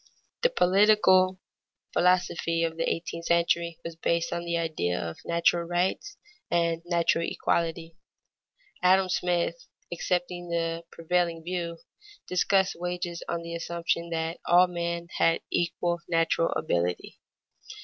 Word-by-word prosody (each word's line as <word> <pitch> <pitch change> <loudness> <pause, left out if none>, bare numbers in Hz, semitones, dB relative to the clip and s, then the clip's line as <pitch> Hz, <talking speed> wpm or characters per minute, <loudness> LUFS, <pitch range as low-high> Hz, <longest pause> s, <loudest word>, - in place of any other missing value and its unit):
_ - - -63
The - - +4
political 185 - +4 0.5
philosophy 175 -2 +2
of 165 -1 -1
the 165 - 0
eighteenth 165 0 -4
century 170 0 +1
was 165 -1 -5
based 170 +1 0
on 170 - -3
the 170 0 -1
idea 155 - -1
of 80 -1 -5
natural 170 0 +2
rights 180 - -1 0.3
and 170 -1 +1
natural 170 -1 +1
equality. 165 0 -2 0.8
Adam 185 +1 +4
Smith, 175 -2 -1 0.3
accepting 175 0 -2
the 165 0 -2
prevailing 170 0 -1
view, 170 -1 -3 0.5
discussed 190 +1 +2
wages 175 0 -4
on 170 - -2
the 170 0 -6
assumption 170 0 -2
that 165 0 -3
all 175 +1 +7
men 170 -1 -3
had 165 - +3
equal 175 0 0
natural 165 0 +2
ability. 90 - -2
170 Hz, 125 wpm, -27 LUFS, 165-180 Hz, 0.8 s, all